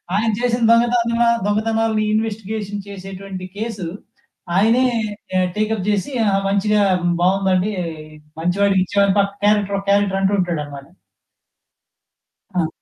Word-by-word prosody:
ఆయన 220 +2 +1
చేసిన 245 0 0
దొంగతనదల 235 0 +3 0.2
దొంగతనాలు 220 +1 0 0.2
ఇన్‌వెస్టిగేషన్ 215 -2 -3
చేసేటువంటి 195 -1 -8
కేసు, 210 -5 -4 0.7
ఆయనే 230 +6 +4 0.7
టేక్ 215 +1 0
అప్ 200 -1 -5
చేసి, 205 +7 -1
ఆహా! 195 -1 +2
మంచిగా 205 +1 +2 0.4
బావుందండి, 190 +2 +2 0.7
మంచి 175 +3 0
వాడికి 195 -2 +3
ఇచ్చేవాడిని 200 +1 +2
పక్క 200 0 +1
క్యారెక్టర్ 205 -1 +2
ఒక 195 - -11
క్యారెక్టర్ 200 -1 +2
అంటూంటాడన్నమాట. 170 -8 -1 1.7
ఆ! 175 -3 +1
200 Hz, 110 wpm, -20 LUFS, 190-220 Hz, 1.7 s, ఆయనే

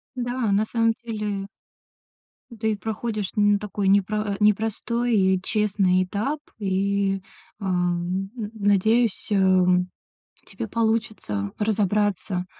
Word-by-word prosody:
Да, 245 -3 -1
на 205 +2 +3
самом 230 0 +1
деле 210 -3 -4 1.1
ты 220 0 0
проходишь 215 -2 -3
н 205 -1 +4
такой 205 -1 -3
непро 200 +2 +3
а, - - -4
непростой 225 +3 +1
и 190 -2 +3
честный 195 -3 +2
этап. 215 +11 -2 0.2
И, 195 -1 0 0.4
ам, 180 0 -1
н 215 -4 -5
надеюсь, 215 +2 +2
эм, 185 -3 +4 0.6
у - - -33
тебя 230 - -6
получится 220 - -1
разобраться, 205 -3 0
205 Hz, 110 wpm, -24 LUFS, 190-220 Hz, 1.1 s, н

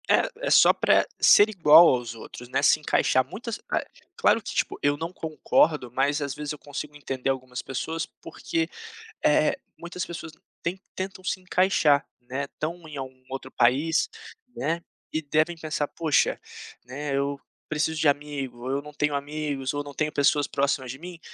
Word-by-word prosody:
É - - +4 0.2
é - - +2
só - - +7
para - - +3
ser 205 +1 +7
igual 165 -4 +8
aos 120 -2 -1
outros, 120 +2 -10
né, 130 - +1
se 150 - +5
encaixar 130 -3 +2
muitas 230 +2 -5 0.6
claro - - +4
que - - -6
tipo - - -1
eu 145 0 +2
não 165 +3 -4
concordo 155 -5 +1
mas 140 +4 +1
às 140 -2 -2
vezes 150 0 -5
eu 150 - -10
consigo 145 +1 -7
entender 135 -2 -3
algumas 130 -2 -3
pessoas 160 +5 -3 0.2
porque, 330 -1 -3 0.6
eh, - - +4 0.2
muitas 175 +1 -5
pessoas 165 -2 -7 0.3
ten 180 +3 -3 0.2
tentam 190 0 -5
se 185 0 -2
encaixar, 180 -6 +3 0.2
né, 130 +3 -4
estão 160 +4 -6
em 150 -2 -8
algum 130 -1 -8
outro 135 0 -6
país, 140 +7 +2 0.5
né, 165 +4 -1 0.3
e 155 - -1
devem 155 +3 +1
pensar: 155 -2 -2
"Poxa, 160 -2 +1 0.5
né, 140 +3 -4
eu 140 0 -1 0.3
preciso 155 +1 0
de 155 - +3
amigo 140 -4 -1
ou - - -3
eu 140 +1 0
não 150 0 -11
tenho 150 0 0
amigos 145 -2 -3
ou 145 0 -2
não 145 0 -9
tenho 155 -1 0
pessoas 145 0 +3
próximas 140 -2 0
de 130 - -9
mim, 175 +1 -9
145 Hz, 175 wpm, -26 LUFS, 135-160 Hz, 0.6 s, igual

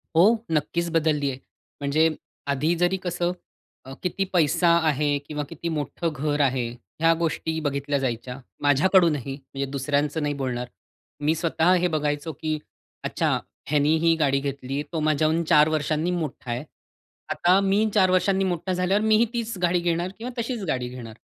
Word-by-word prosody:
हो, 165 - +6 0.3
नक्कीच 170 +2 0
बदलली 155 -3 +1
आहे. 130 - -8 0.4
म्हणजे 155 +3 +3 0.4
आधी 150 +5 +1
जरी 175 +2 +1
कसं 175 -1 -1 0.5
अ, 135 - -8
किती 180 +2 0
पैसा 170 0 +3 0.2
आहे 150 0 +1 0.2
किंवा 150 0 -4
किती 165 +1 -5
मोठं 155 +3 -2
घर 145 +1 -1
आहे, 130 -3 +1 0.3
ह्या 165 0 +5
गोष्टी 160 -1 -1
बघितल्या 140 0 0
जायच्या. 125 0 -3 0.2
माझ्याकडूनही 150 - +3
म्हणजे 140 0 -6
दुसऱ्यांचं 145 +3 0
नाही 145 0 0
बोलणार. 125 -2 -2 0.6
मी 155 +2 +3
स्वतः 165 +1 +2
हे 180 - +3
बघायचो, 150 +1 -1
की 155 +2 -2 0.5
"अच्छा - - 0 0.4
ह्यानी 150 +1 +3
ही 165 0 +5
गाडी 140 -2 +3
घेतली. 140 0 -3
तो 165 - 0
माझ्याहून 155 +2 +2
4 150 -2 +7
वर्षांनी 155 +2 0
मोठा 155 -7 -4
आहे. 120 +3 -3 0.7
आता 180 +2 +4
मी 200 +3 +2
4 190 -3 +4
वर्षांनी 190 +1 +2
मोठा 185 0 -1
झाल्यावर, 185 +3 +1
मीही 220 +1 +5
तीच 230 -3 -3
गाडी 175 0 +3
घेणार 175 +1 -1
किंवा 240 +3 -5
तशीच 230 -2 -3
गाडी 125 -4 -1
घेणार." 120 -3 -9
155 Hz, 160 wpm, -25 LUFS, 140-175 Hz, 0.7 s, 4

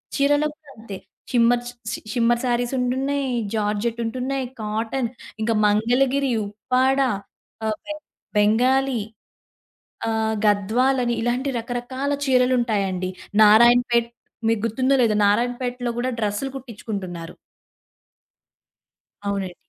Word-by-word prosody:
చీరల్లో 290 +2 +3
కూడా 305 -3 -19
అంతే. 215 -3 -8 0.3
షిమ్మర్ 240 0 +3
షి 245 - -7 0.2
షి - - -4
షిమ్మర్ 240 0 +2
శారీస్ 245 +1 0
ఉంటున్నాయి. 270 +3 0 0.3
జార్జెట్ 215 +2 -1
ఉంటున్నాయి. 260 +3 -2 0.2
కాటన్, 225 +3 -2 0.3
ఇంకా 225 +1 +1
మంగళగిరి, 250 +6 +2 0.2
ఉప్పాడ, 255 +6 +1 0.7
ఆహ్, 215 0 0
బెం 305 0 -5 0.4
బెంగాలీ, 250 +4 +3 1.1
ఆహ్, 220 0 0
గద్వాల్ 225 +6 +2
అని 240 0 0
ఇలాంటి 250 +3 0
రకరకాల 245 +4 -3 0.2
చీరలుంటాయండి. 230 -8 +1 0.3
నారాయణపేట్ 235 +2 +5 0.4
మీకు 225 -2 +1
గుర్తుందో? 260 +5 +1
లేదో? 225 -3 +3
నారాయణపేటలో 245 +3 0
కూడా 255 +1 0
డ్రెసులు 210 +6 -1
కుట్టించుకుంటున్నారు. 195 -8 -6 1.9
అవునండి. 195 -3 -2
240 Hz, 100 wpm, -23 LUFS, 215-260 Hz, 1.9 s, నారాయణపేట్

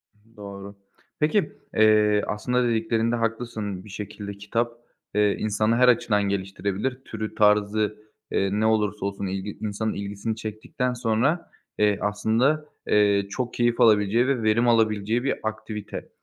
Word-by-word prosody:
I - - -32
hı, - - -27
doğru. 100 0 -9 0.4
Peki, 155 +7 +2 0.2
eee, 105 -1 +4
aslında 125 +3 0
dediklerinde 115 0 +1
haklısın 115 -4 -3
bir - - -12
şekilde 100 0 -7
kitap, 115 +4 -1 0.4
eee, 105 -1 +3
insanı 110 +1 +1
her 125 +1 +5
açıdan 105 -4 +3
geliştirebilir, 100 +5 -2
türü 110 -1 -5
tarzı, 105 0 +2 0.3
eee, 100 0 +1
ne 110 - +2
olursa 105 -2 +1
olsun 100 0 -3
ilgi 95 +2 -4
insanın 110 +1 -2
ilgisini 100 +2 -4
çektikten 115 +3 -3
sonra, 125 +8 0 0.3
eee, 105 -1 +3
aslında, 115 +9 +1 0.2
eee, 100 -1 +3
çok 120 +3 -3
keyif 120 0 +1
alabileceği 110 +2 +4
ve 130 -5 0
verim 115 +3 +3
alabileceği 110 0 +2
bir 135 - +1
aktivite. 110 -1 -5
110 Hz, 140 wpm, -25 LUFS, 105-115 Hz, 0.4 s, her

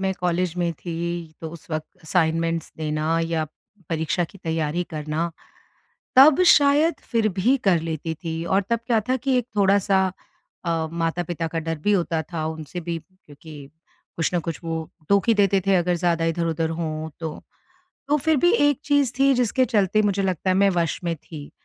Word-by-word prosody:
मैं 190 0 0
कॉलेज 180 -1 0
में 175 -1 0
थी, 170 0 -5
तो 160 - -6
उस 170 -1 -12
वक़्त 155 0 -5
असाइनमेंट्स 165 0 0
देना 155 +1 -1
या 165 -1 -1 0.4
परीक्षा 165 +2 0
की 195 - -14
तैयारी 160 +1 -1
करना, 155 +2 -2 0.9
तब 285 +6 +8
शायद 295 +2 +5 0.2
फिर 225 -3 +2
भी 245 +9 +4
कर 175 -4 +4
लेती 160 0 -4
थी। 165 0 -5
और 190 +4 +2
तब 235 0 +1
क्या 230 -3 +3
था 255 - +2
कि 260 +1 0
एक 245 - -2
थोड़ा-सा 195 -1 +3 0.5
अ, 165 -1 0
माता-पिता 165 0 -2
का 165 +1 -3
डर 165 -1 -3
भी 205 - +3
होता 170 -4 +1
था, 160 0 -5
उनसे 160 +2 -5
भी 170 0 -3
क्योंकि 150 -5 -14 0.5
कुछ 165 - 0
न - - +3
कुछ 165 - -3
वो 165 0 -2 0.3
टोक 200 +3 +3
ही 230 - +6
देते 200 -1 +3
थे, 195 - +4
अगर 180 0 +2
ज़्यादा 170 -1 +1
इधर-उधर 165 -1 -1
हों 155 -1 -3
तो। 160 -1 -3 0.8
तो 295 - +4
फिर 310 +1 +2
भी 350 +6 +4
एक 290 - +3
चीज़ 285 -4 +2
थी, 275 0 +5
जिसके 250 +1 +2
चलते 215 -3 +2
मुझे 200 -1 +1
लगता 185 -1 0
है, - - +3
मैं 200 0 +4
वश 170 -3 0
में 170 -1 0
थी। 150 -1 -10
170 Hz, 185 wpm, -23 LUFS, 160-200 Hz, 0.9 s, तब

